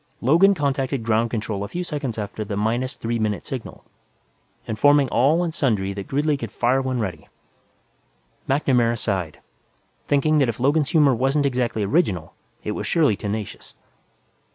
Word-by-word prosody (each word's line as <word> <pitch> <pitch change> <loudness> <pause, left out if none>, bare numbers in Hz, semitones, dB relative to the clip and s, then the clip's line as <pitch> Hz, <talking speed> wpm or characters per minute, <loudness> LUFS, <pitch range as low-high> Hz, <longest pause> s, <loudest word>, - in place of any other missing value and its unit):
Logan 170 +10 +4
contacted 135 -4 -1
Ground 115 +1 +1
Control 110 -3 -3
a - - -4
few 175 - -4
seconds 145 -8 -4
after 105 0 -4
the 100 -1 -4
minus 120 +5 -1
three 115 0 -3
minute 105 -2 -2
signal, 130 -4 -7 0.8
informing 145 +5 +3
all 150 +10 +3
and 165 -2 -3
sundry 105 - 0
that 100 -1 -7
Gridley 145 +1 0
could 115 -6 -6
fire 125 +4 +1
when 130 -2 -2
ready. 90 -8 -5 1.2
MacNamara 125 -4 +2
sighed, 95 -8 -3 0.7
thinking 150 +2 +2
that 135 -4 +3
if 115 - -4
Logan's 145 +3 +2
humor 150 -6 +4
wasn't 135 +4 +1
exactly 125 -5 0
original, 100 - 0 0.3
it - - -3
was - - -4
surely 155 -10 +3
tenacious. 105 +1 -6
125 Hz, 155 wpm, -22 LUFS, 110-145 Hz, 1.2 s, Logan